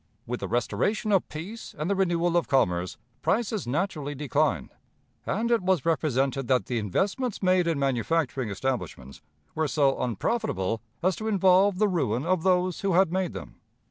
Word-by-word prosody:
With 125 0 -4
the - - -4
restoration 120 - 0
of 195 -3 +2
peace 190 +9 -8
and 150 +2 -2
the 200 - +2
renewal 175 -2 +1
of 175 - +2
commerce, 90 -9 +1 0.2
prices 215 - 0
naturally 145 0 -2
declined, 145 - 0 0.6
and 230 +4 0
it 235 - +3
was 185 -5 +1
represented 135 -4 0
that 130 -2 +2
the 120 -2 -1
investments 200 - -1
made 185 -1 +3
in 165 -3 +1
manufacturing 135 -1 0
establishments 100 - -4 0.3
were 160 0 0
so 140 -2 +2
unprofitable 115 - -1 0.2
as 185 0 +2
to 220 - -4
involve 190 -1 +4
the 210 +2 +3
ruin 145 - 0
of 180 -1 +1
those 180 0 +1
who 195 -2 +1
had 185 -1 +4
made 185 -2 -1
them. - - -9
165 Hz, 165 wpm, -27 LUFS, 130-190 Hz, 0.6 s, involve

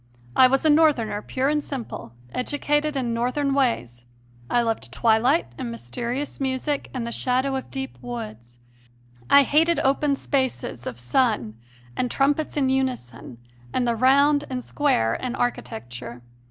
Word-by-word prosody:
I 255 - +8
was 270 +4 +1
a - - +6
Northerner 280 -10 +3
pure 260 +4 -1
and 300 0 +1
simple, 245 - -6 0.2
educated 295 +3 0
in 245 -4 -1
Northern 255 +4 0
ways. 120 - -1 0.4
I 240 - +2
loved 225 -1 -2
twilight 230 - +2
and 120 - -3
mysterious 235 - -4
music 270 +2 -2
and 250 -3 -4
the 235 - -4
shadow 260 +3 0
of 265 - -5
deep 265 -1 -6
woods; 215 - -7 0.7
I 280 - +8
hated 325 +5 +3
open 280 +1 +2
spaces 260 - -2
of 120 - -5
sun 120 - 0 0.4
and 250 - -1
trumpets 290 +4 0
in 270 -2 +2
unison 255 - -2 0.4
and 250 -1 +1
the 235 - +1
round 280 +4 +4
and 255 -1 -4
square 115 - +1
in 250 - -3
architecture. 120 - -4
255 Hz, 145 wpm, -24 LUFS, 220-280 Hz, 0.7 s, I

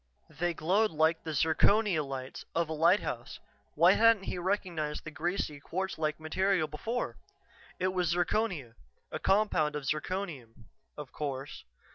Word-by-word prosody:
They 170 +3 -1
glowed 200 +8 +2
like 160 +1 +2
the 160 -2 -4
"zirconia 175 +3 +3
lights" 135 -2 -6
of 165 -1 +1
a - - -2
lighthouse. 165 +6 +1 0.4
Why - - +6
hadn't 230 -3 +5
he 180 - -4
recognized 175 -5 -2
the 155 - -7
greasy, 155 -2 -2
quartz 190 +5 -4
like 155 0 -1
material 180 +1 +1
before? 225 +11 -3 0.6
It 185 0 +1
was 180 -3 +1
zirconia, 175 - 0 0.4
a - - -3
compound 190 -7 +2
of 150 - -3
zirconium, 155 - -4 0.3
of 145 -3 -8
course. 140 -2 -5
165 Hz, 140 wpm, -31 LUFS, 150-190 Hz, 0.6 s, Why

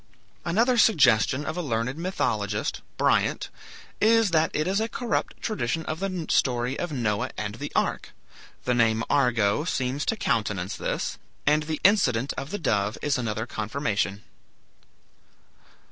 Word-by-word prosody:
Another 230 +8 +2
suggestion 130 - +4
of 155 - -3
a 180 - -2
learned 125 -3 -1
mythologist, 110 - -2 0.2
Bryant, - - +1 0.5
is 225 -2 +4
that 160 -1 +3
it 155 - 0
is 190 +3 +1
a 225 - -1
corrupt 240 -1 -2
tradition 165 - -1
of 155 - -3
the 185 -4 -3
story 125 0 +1
of 175 - -3
Noah 110 -7 -1
and 105 -1 -3
the 145 +6 -6
ark. - - 0 0.6
The 125 - +2
name 115 -2 +2
"Argo" 120 -3 +2
seems 135 -3 -1
to - - +2
countenance 105 - -1
this, - - -3 0.3
and 150 +1 +4
the 155 0 -3
incident 135 - +3
of 135 - -5
the 205 - -3
dove 105 - 0
is 145 -3 +1
another 110 -2 -2
confirmation. 105 -3 -2
135 Hz, 145 wpm, -26 LUFS, 110-170 Hz, 0.6 s, suggestion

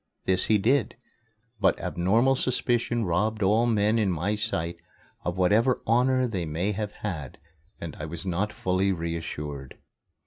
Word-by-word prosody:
This 95 0 +2
he 110 - +4
did. 115 +2 +1 0.6
But 100 - +3
abnormal 110 +10 +2
suspicion 120 -3 0
robbed 105 +5 0
all 110 +5 +3
men 110 0 +2
in 100 -4 +2
my 90 +5 -1
sight 85 -5 -2 0.5
of 90 +1 -3
whatever 110 +8 +3
honor 130 +3 +3
they 100 -7 -2
may 85 +7 -1
have 105 0 -3
had, 80 -10 -4 0.4
and 85 -2 -6
I 80 - -6
was 85 +5 -5
not 95 +3 -1
fully 95 +1 0
reassured. 80 -5 -5
100 Hz, 145 wpm, -26 LUFS, 85-115 Hz, 0.6 s, he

